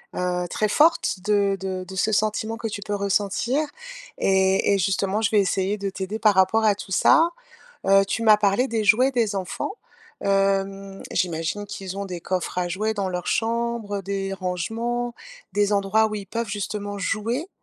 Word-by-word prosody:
heu, 180 -1 -1
très 215 - 0
forte 300 - +3
de 200 -1 +2
de 185 -1 -4
de 190 - -8
ce 200 +4 +1
sentiment 215 +1 0
que 225 - -3
tu 205 -1 -5
peux 205 0 -3
ressentir. 205 +6 0 0.6
Et 190 +1 +3
et - - +3
justement, 195 +3 0
je 225 +1 +1
vais 210 - +4
essayer 195 +1 0
de 200 -1 -3
t'aider 195 +3 -4
par 210 -2 +4
rapport 190 +4 +3
à 210 - +5
tout 195 - -10
ça. 325 - +5 0.6
Heu, 195 0 +6
tu 225 +3 -2
m'as 215 -2 +7
parlé 210 +5 +2
des 225 -2 -1
jouets 250 +6 +5
des 225 -4 +1
enfants. 190 - -3 0.5
Hem, 195 0 0
j'imagine 170 +3 -2
qu'ils 195 -1 -6
ont 200 - -3
des 180 -2 -6
coffres 185 0 -3
à 180 -1 0
jouets 215 +5 -1
dans 200 -3 -1
leur 180 -1 -4
chambre, 230 -2 -1
des 195 0 -3
rangements, 225 +7 -2 0.4
des 205 0 +2
endroits 205 +2 +3
où 215 - -4
ils 205 -2 -5
peuvent, 230 +2 -3
justement, 205 0 -4
jouer? 230 - -2
200 Hz, 180 wpm, -24 LUFS, 190-220 Hz, 0.6 s, m'as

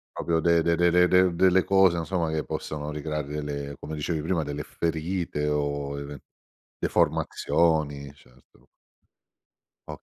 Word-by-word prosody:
Proprio 85 -1 0
de 85 -1 +3
de 85 0 +2
de 85 0 +3
de 90 0 +5
de 90 0 +4
delle 95 +1 +4
cose 95 -3 +4
insomma 85 -1 -1
che 80 -1 -2
possono 75 0 -5
ricreare 75 -1 -4
delle 70 -1 -5
come 80 +1 -6
dicevi 75 +1 -2
prima 85 -2 -1
delle 75 0 -4
ferite 80 -2 -2
o 70 -1 -2
even 70 0 -7 0.6
deformazioni 75 -4 0
certo. 65 0 -24 1.2
Okay. - - -8
80 Hz, 135 wpm, -26 LUFS, 75-85 Hz, 1.2 s, de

